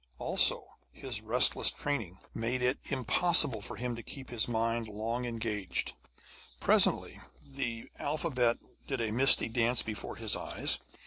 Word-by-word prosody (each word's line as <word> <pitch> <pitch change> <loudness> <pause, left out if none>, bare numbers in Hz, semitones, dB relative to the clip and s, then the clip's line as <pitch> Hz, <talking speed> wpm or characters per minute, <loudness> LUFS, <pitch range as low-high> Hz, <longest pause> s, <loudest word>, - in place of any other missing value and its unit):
Also, - - +3 0.3
his 120 -5 -5
restless 110 +3 +4
training 115 -11 -4 0.2
made 120 +3 -2
it 125 +2 +1
impossible 135 - +3
for - - -7
him 125 -1 -4
to 115 - -8
keep 130 +2 -8
his 115 -3 -1
mind 115 0 -1
long 115 +4 -4
engaged; 110 -5 -2 0.7
presently, - - +2 0.2
the 125 -5 -5
alphabet 140 -6 0 0.3
did 135 -2 -3
a 115 -2 -2
misty 130 +5 +6
dance 115 +1 +2
before 110 -2 -6
his - - -1
eyes. - - -1
120 Hz, 135 wpm, -30 LUFS, 110-130 Hz, 0.7 s, misty